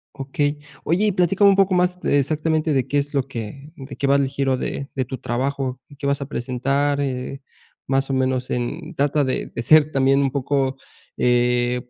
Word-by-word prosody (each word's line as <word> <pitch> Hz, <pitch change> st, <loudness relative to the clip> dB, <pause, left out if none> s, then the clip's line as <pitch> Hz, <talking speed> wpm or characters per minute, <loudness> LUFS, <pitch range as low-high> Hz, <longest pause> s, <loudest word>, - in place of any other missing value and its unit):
Okey. 145 Hz, +2 st, -1 dB, 0.3 s
Oye 180 Hz, +7 st, +1 dB
y -, -, +3 dB
platícame 195 Hz, +2 st, +4 dB
un 195 Hz, -, +5 dB
poco 195 Hz, -1 st, +3 dB
más 180 Hz, 0 st, +1 dB
de 145 Hz, -, +2 dB
exactamente 155 Hz, +2 st, 0 dB
de 130 Hz, -1 st, +1 dB
qué 145 Hz, -, 0 dB
es 145 Hz, +1 st, -1 dB
lo 135 Hz, -1 st, 0 dB
que, 115 Hz, -5 st, -5 dB
eh, 140 Hz, +4 st, -13 dB
de 135 Hz, -1 st, -9 dB
qué 140 Hz, -, -1 dB
va 140 Hz, -, +4 dB
el 140 Hz, -1 st, +2 dB
giro 135 Hz, -1 st, 0 dB
de 140 Hz, +2 st, -4 dB
de 130 Hz, -2 st, -1 dB
tu 130 Hz, +1 st, -6 dB
trabajo, 130 Hz, +2 st, -2 dB
y 145 Hz, -, -15 dB
qué 140 Hz, 0 st, -4 dB
vas 140 Hz, 0 st, 0 dB
a -, -, -2 dB
presentar, 140 Hz, +3 st, -1 dB
eh, 135 Hz, 0 st, -3 dB, 0.5 s
más 135 Hz, +1 st, +1 dB
o -, -, -1 dB
menos 130 Hz, -1 st, 0 dB
en 155 Hz, +8 st, -4 dB
trata 145 Hz, +1 st, +2 dB
de 130 Hz, -, -2 dB
de 115 Hz, -, -5 dB
ser 155 Hz, +3 st, +5 dB
también 135 Hz, 0 st, +3 dB
un 135 Hz, -2 st, +1 dB
poco, 135 Hz, -1 st, 0 dB, 0.4 s
eh, 125 Hz, 0 st, +1 dB
140 Hz, 210 wpm, -22 LUFS, 130-145 Hz, 0.5 s, un